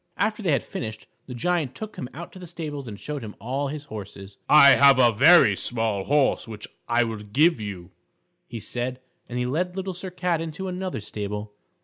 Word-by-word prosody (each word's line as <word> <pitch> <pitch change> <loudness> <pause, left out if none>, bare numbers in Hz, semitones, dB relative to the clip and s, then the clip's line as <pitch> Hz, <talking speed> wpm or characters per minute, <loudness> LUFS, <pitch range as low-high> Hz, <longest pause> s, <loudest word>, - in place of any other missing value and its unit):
After 215 +3 0
they 180 -6 +1
had 140 - +2
finished, 110 -2 -6 0.2
the 125 - -7
Giant 155 0 -1
took 215 -1 -7
him 125 - -6
out 170 +3 -9
to 185 - -11
the 180 - -9
stables 150 -5 -6
and 105 -2 -8
showed 150 -4 -5
him 105 -1 -8
all 135 +5 -2
his 145 +1 -5
horses. 100 -5 -10
"I 140 -2 +9
have 140 -1 +7
a 120 -2 +6
very 130 - +6
small 110 -3 -1
horse 145 -4 +2
which 110 -2 -8 0.2
I 120 +1 +3
will 115 -2 -3
give 130 +7 +2
you," 95 -4 -7 0.6
he 115 - -6
said, 125 +3 -4 0.3
and 125 - -4
he 125 - 0
led 180 +8 -1
Little 190 0 -3
Sir 185 +2 -7
Cat 180 -2 -1
into 165 +4 -5
another 185 - -4
stable. 105 0 -5
135 Hz, 205 wpm, -25 LUFS, 110-170 Hz, 0.6 s, I